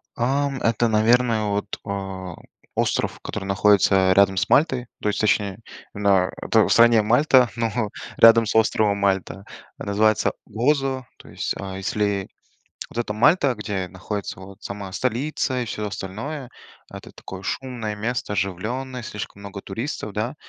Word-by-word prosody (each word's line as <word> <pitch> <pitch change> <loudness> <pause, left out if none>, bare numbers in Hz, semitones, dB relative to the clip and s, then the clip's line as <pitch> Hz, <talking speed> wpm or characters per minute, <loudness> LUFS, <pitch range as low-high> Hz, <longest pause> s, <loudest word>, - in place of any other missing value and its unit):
Ам, 135 +3 0
это, 115 +1 +2
наверное, 115 +1 +3
вот, 100 0 -2
э, 95 -2 -5 0.4
остров, - - 0
который 95 - -5
находится 95 -1 +4
рядом 95 0 +4
с - - 0
Мальтой, 130 -5 +3
то 105 - 0
есть, 105 - -2
точнее, 105 -1 +1 0.3
на 100 -2 +2
это - - +3
в - - -3
стране 115 -1 +6
Мальта, 125 +2 +4
но 115 -2 -1 0.3
рядом 115 0 +7
с 105 - -2
островом 110 -2 +3
Мальта. 95 0 -1 0.4
Называется 110 +1 +2
"Гозо", 130 +3 0
то - - -16
есть, - - -3
а, 95 -1 -6
если 100 0 -1 0.6
вот - - -12
эта 115 -3 -1
Мальта, 140 - +4
где 100 -3 -3
находится 95 +2 -6
вот 100 +2 -12
сама 100 -1 -6
столица 130 +3 -1
и - - -2
всё 105 0 -4
остальное- 120 +9 -6 0.4
это - - -10
такое 95 0 -9
шумное 120 -3 -4
место, 115 0 -3
оживленное, 110 +8 -3
слишком 105 -3 -7
много 100 -1 -7
туристов, 115 +1 -5
да, 110 +6 -2
105 Hz, 145 wpm, -23 LUFS, 100-120 Hz, 0.6 s, рядом